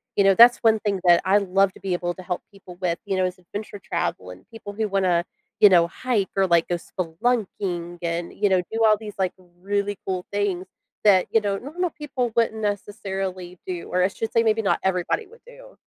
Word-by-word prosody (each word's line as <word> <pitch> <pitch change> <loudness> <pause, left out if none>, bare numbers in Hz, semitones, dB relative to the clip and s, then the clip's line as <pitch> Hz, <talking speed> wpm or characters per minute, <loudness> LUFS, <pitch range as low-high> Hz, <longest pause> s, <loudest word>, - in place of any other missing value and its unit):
You 200 - +4
know, 195 0 +6
that's 240 +1 +8
one 220 -1 +3
thing 205 -3 -1
that 175 -1 +6
I 195 +2 +4
love 195 -1 +2
to - - -15
be 190 -2 -2
able 175 0 -2
to 185 - -10
help 180 0 -3
people 190 -3 -13
with, 170 -2 0
you 195 -2 -1
know, 185 - +2
is 185 0 -4
adventure 205 +4 -8
travel 170 - -3
and 90 +1 -15
people 205 -3 -9
who 215 0 -1
wanna, 185 -3 +1 0.4
you 210 - +8
know, 170 -3 +5
hike 215 0 -1
or, 195 -1 +3
like, 170 -1 +3
go 175 - 0
spelunking 175 -1 -3
and, 170 0 -3
you 205 -1 +1
know, 185 -1 +3
do 225 0 0
all 215 -1 +5
these, 210 -1 -8
like, 185 -2 0 0.3
really 200 0 -1
cool 185 -1 -2
things 200 -3 -1 0.4
that, 195 -4 +5
you 225 - +5
know, 200 -1 -1
normal 345 +7 -3
people 270 -6 -3
wouldn't 220 -1 +1
necessarily 195 -3 -4
do- 180 -2 -5
or 180 - +2
I - - +4
should 220 +3 -5
say 230 - +3
maybe 225 0 +2
not 200 - +1
everybody 190 - 0
would 470 0 -18
do. - - -15
195 Hz, 220 wpm, -23 LUFS, 180-215 Hz, 0.4 s, that's